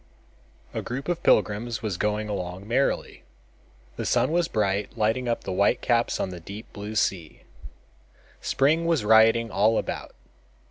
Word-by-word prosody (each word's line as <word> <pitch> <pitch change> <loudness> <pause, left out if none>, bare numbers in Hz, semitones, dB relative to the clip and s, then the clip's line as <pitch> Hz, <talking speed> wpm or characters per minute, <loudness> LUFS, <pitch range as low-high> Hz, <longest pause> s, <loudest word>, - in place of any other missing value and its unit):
A - - -2
group 135 +4 -5
of 175 -1 -1
pilgrims 115 -3 +1
was 105 -4 -2
going 105 +1 -1
along 95 -1 -5
merrily. 130 +4 -1 0.7
The - - -3
sun 125 +3 +2
was 170 -1 +2
bright, 100 -1 -1
lighting 110 +4 0
up 115 - -1
the - - -4
white 100 +2 +2
caps 120 -1 +1
on - - -1
the 90 - -7
deep 100 +7 -10
blue 105 +2 -7
sea. 90 -6 -1 1.0
Spring 155 +5 +2
was 160 -10 +1
rioting 110 +1 +5
all 110 +2 +3
about. - - -4
110 Hz, 150 wpm, -25 LUFS, 100-120 Hz, 1.0 s, rioting